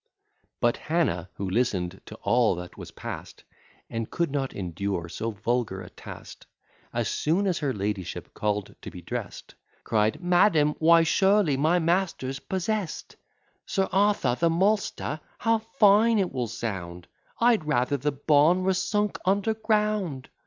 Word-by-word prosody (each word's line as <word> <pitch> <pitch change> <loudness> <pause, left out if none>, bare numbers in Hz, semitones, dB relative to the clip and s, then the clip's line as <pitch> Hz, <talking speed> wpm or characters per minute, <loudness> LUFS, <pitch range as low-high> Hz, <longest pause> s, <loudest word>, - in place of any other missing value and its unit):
But 120 0 +2
Hannah, 125 - -1
who 100 - -4
listen'd 95 -4 -1
to 110 - -9
all 120 -5 +3
that 90 0 -8
was - - -9
past, - - -8 0.4
And 115 -1 -4
could 170 -4 -1
not 135 -2 -1
endure 90 -1 -3
so 110 +6 -4
vulgar 110 -1 -2
a - - -10
taste, - - -11 0.4
As - - -1
soon 170 +7 0
as 185 -4 0
her 145 -3 0
ladyship 100 -5 -4
call'd 105 -2 -2
to - - -7
be 90 - -11
dress'd, - - -6 0.3
Cried, 110 0 +1
"Madam, 175 -4 +3
why 165 +1 +6
surely 190 -2 +3
my 155 +6 +2
master's 165 -6 0
possess'd, 190 +1 -3 0.5
Sir 190 -1 0
Arthur 195 -9 +2
the 170 - +3
maltster! 190 -3 0 0.2
how 225 -1 +2
fine 215 +2 +4
it 190 -3 +1
will 125 -3 -1
sound! 95 -6 -5 0.3
I'd 230 -8 +3
rather 145 -1 +1
the 145 +3 -1
bawn 150 +5 +3
were 190 +1 +2
sunk 210 +2 -1
under 200 +3 +1
ground. 210 - -1
150 Hz, 145 wpm, -26 LUFS, -, 0.5 s, why